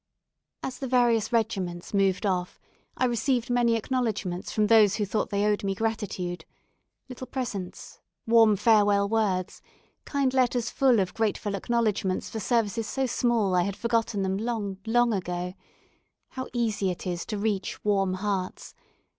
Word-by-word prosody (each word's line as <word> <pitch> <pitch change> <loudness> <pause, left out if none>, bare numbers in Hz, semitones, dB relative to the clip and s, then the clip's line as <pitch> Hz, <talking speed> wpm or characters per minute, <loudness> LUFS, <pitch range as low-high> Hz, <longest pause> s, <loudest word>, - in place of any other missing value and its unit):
As 255 -1 -5
the 270 - -3
various 240 -3 +2
regiments 195 -7 -1
moved 195 0 +2
off, 180 -2 -1 0.4
I 255 - +2
received 245 0 0
many 240 -1 +3
acknowledgments 220 -7 -2
from 215 - +2
those 215 -2 +5
who 210 -1 -1
thought 215 +2 -1
they 205 0 0
owed 210 -1 +1
me 195 -1 -1
gratitude. 195 -6 -3 0.6
Little 255 0 -8
presents, 220 -9 -5 0.3
warm 225 -2 +5
farewell 205 -1 +4
words, 200 -4 -1 0.4
kind 275 -2 0
letters 245 -3 +1
full 255 -5 +3
of 185 -2 -1
grateful 215 -2 -1
acknowledgments 210 -2 -1
for 220 - -4
services 225 0 0
so 270 0 -1
small 235 -5 +1
that 180 - +2
I - - +3
had 200 -1 -3
forgotten 230 -3 0
them 190 0 -1
long, 210 -3 -3
long 240 0 +3
ago 180 -2 -3 0.8
how 260 0 -6
easy 220 -5 0
it 180 +1 -5
is 175 -2 -2
to 215 - -3
reach 205 -2 -2
warm 195 -2 +2
hearts! 190 -1 -3
215 Hz, 155 wpm, -27 LUFS, 195-235 Hz, 0.8 s, those